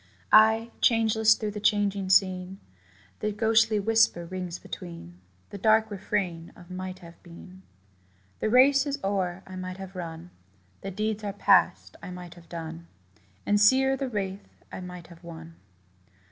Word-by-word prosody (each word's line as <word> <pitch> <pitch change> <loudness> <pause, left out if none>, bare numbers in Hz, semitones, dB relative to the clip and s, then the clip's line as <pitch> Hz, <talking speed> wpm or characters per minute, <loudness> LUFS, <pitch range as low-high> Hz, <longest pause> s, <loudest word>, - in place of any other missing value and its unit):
Ay, 220 +1 +5
changeless 220 -1 +4
through 215 -2 -4
the 210 - -6
changing 200 -2 +1
scene, 185 0 +2 0.6
The 215 - -1
ghostly 220 0 +2
whisper 220 -5 +2
rings 180 0 -5
between, 85 +1 -10 0.3
The 200 - -7
dark 220 +2 +3
refrain 185 -4 -3
of 180 0 -15
'might 185 0 -6
have 170 0 -15
been.' 180 +2 -14 0.8
The - - -1
race 270 +4 +5
is 280 0 -2
o'er 190 -2 -2
I 190 - -10
might 185 0 -6
have 190 0 -9
run: 170 0 -7 0.5
The 195 - -5
deeds 215 +2 -3
are 200 -1 -3
past 205 - +2
I - - -8
might 180 -1 -9
have 170 -2 -18
done; 165 0 -7 0.6
And 205 0 +2
sere 265 +5 +4
the 270 -1 -4
wreath 195 -3 -4 0.2
I - - -7
might 180 -2 -9
have 170 0 -16
won. 165 -1 -10
195 Hz, 155 wpm, -27 LUFS, 180-215 Hz, 0.8 s, Ay